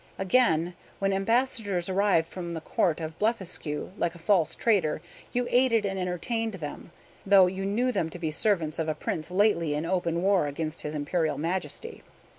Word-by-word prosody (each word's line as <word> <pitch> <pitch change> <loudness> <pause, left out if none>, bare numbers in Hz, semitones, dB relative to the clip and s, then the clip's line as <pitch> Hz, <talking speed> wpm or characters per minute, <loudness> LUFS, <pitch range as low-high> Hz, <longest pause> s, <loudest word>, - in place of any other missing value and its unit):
"Again, 180 -4 +2 0.2
when 195 0 0
ambassadors 205 -3 +1
arrived 190 -4 +2
from 175 -2 -6
the 170 -1 -4
Court 160 +1 0
of 160 0 -6
Blefuscu, 190 -9 -2
like 170 0 0
a - - -10
false 170 -1 +2
traitor, 195 -11 +2 0.3
you 245 0 0
aided 240 -4 +4
and 195 -1 -2
entertained 200 +5 -2
them, 155 -1 -7 0.3
though 195 -1 +7
you 190 +2 -2
knew 240 +6 +1
them 165 -9 -1
to 170 - -8
be 160 -3 -2
servants 165 -3 +1
of 160 -1 -1
a 155 - -1
prince 155 +1 -4
lately 180 -5 +2
in 150 +2 -2
open 170 -1 0
war 195 -6 +3
against 155 +3 -3
his 150 0 -5
Imperial 150 0 0
Majesty. 185 - -3
180 Hz, 175 wpm, -27 LUFS, 160-205 Hz, 0.3 s, though